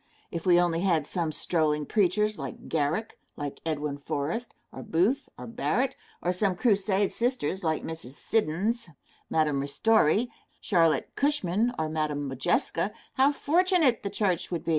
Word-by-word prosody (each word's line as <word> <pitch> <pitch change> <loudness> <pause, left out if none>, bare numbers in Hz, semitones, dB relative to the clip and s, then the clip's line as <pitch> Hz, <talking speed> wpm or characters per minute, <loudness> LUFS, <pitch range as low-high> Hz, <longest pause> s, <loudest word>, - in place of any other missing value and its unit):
If 170 +1 -4
we 175 -1 +6
only 175 -2 +2
had 170 -5 +2
some 165 0 -1
strolling 150 -2 +1
preachers 210 +3 +1
like - - -7
Garrick, 160 +8 -1 0.2
like 145 -1 -6
Edwin 150 -3 -2
Forrest, 150 +12 -3 0.2
or - - -8
Booth 215 - +1
or - - -8
Barrett, 250 +3 -1 0.3
or 180 - +1
some 190 0 +1
crusade 200 -2 +2
sisters 230 - -1
like 160 -1 0
Mrs. 160 -6 -7
Siddons, 210 +5 0 0.4
Madam 150 -3 +1
Ristori, 215 - +3 0.3
Charlotte 165 -5 +2
Cushman, 240 -6 +1
or 160 - 0
Madam 155 -2 -2
Modjeska, 135 +8 0 0.2
how 270 +2 +4
fortunate 325 - +2
the 200 - -3
church 190 -5 0
would 170 -2 -4
be! - - -2
180 Hz, 145 wpm, -28 LUFS, 155-225 Hz, 0.4 s, we